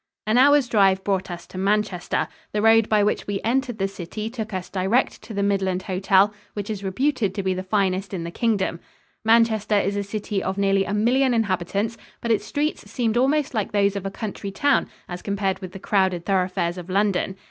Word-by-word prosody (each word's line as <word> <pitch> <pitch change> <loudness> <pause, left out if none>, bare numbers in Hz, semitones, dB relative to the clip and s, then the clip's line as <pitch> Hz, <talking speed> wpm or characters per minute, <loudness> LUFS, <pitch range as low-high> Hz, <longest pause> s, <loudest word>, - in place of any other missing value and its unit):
An 215 +2 +1
hour's 285 0 +5
drive 195 -4 +3
brought 190 -2 -1
us 175 -1 -7
to 185 - -8
Manchester. 200 -2 0 0.3
The 210 - 0
road 225 0 +5
by 210 -1 +4
which 210 - 0
we 200 -1 -1
entered 245 +1 0
the 195 -1 0
city 195 +3 -6
took 220 -3 -5
us 185 -2 -4
direct 195 +7 0
to 225 - -9
the 200 - 0
Midland 190 -2 0
Hotel, 195 +1 +3 0.2
which 205 +1 -4
is 200 -2 -5
reputed 205 0 0
to 200 - -2
be 190 0 +1
the 185 - -3
finest 190 0 0
in 185 -4 -4
the 170 - -5
Kingdom. 205 -6 0 0.4
Manchester 225 -2 +3
is 200 0 0
a 205 - 0
city 205 0 -3
of 190 +1 -3
nearly 195 -1 +2
a 200 - -3
million 250 +4 +3
inhabitants, 200 +1 -1 0.2
but 235 - -2
its 210 -2 +1
streets 295 +7 -2
seemed 230 -3 -1
almost 280 +3 +2
like 215 -3 -2
those 200 -1 +2
of 195 -1 -3
a - - -2
country 200 0 -5
town 285 +8 +1 0.2
as 175 0 -6
compared 200 -1 -1
with 185 -2 -8
the 195 - -8
crowded 190 -3 0
thoroughfares 180 -2 0
of 180 +1 -10
London. 195 -1 +1
200 Hz, 205 wpm, -23 LUFS, 190-225 Hz, 0.4 s, hour's